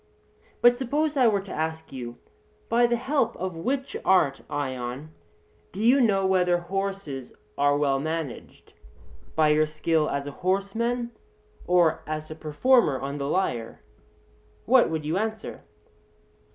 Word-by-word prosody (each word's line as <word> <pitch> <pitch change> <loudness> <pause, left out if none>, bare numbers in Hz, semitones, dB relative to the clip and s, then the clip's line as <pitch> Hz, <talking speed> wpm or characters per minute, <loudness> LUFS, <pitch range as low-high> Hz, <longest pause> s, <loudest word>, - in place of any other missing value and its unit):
But 245 0 +6
suppose 295 +4 0
I 255 -3 +5
were 205 -3 +2
to 195 - -10
ask 160 +1 -3
you: 120 -2 -7 0.5
By 240 +1 +4
the 240 - +1
help 255 -1 0
of 185 -1 -4
which 260 +11 -2
art, 155 -8 +3
Ion, 135 +1 -4 0.6
do 190 - -8
you 245 +5 +5
know 195 -5 +3
whether 180 -2 +3
horses 190 -7 -4 0.2
are 145 0 +3
well 140 -2 +1
managed, 155 -3 -5 0.6
by 155 -1 +4
your 155 +1 +3
skill 155 0 0
as 140 0 -2
a 145 - -5
horseman 225 +6 -1 0.6
or 175 -3 +3
as 155 0 -5
a - - -5
performer 155 - +2
on 140 +2 -4
the 140 - -2
lyre 120 - -2 0.8
what 255 +1 +5
would 160 -2 -3
you 165 +5 0
answer? 220 0 -4
175 Hz, 140 wpm, -26 LUFS, 150-225 Hz, 0.8 s, But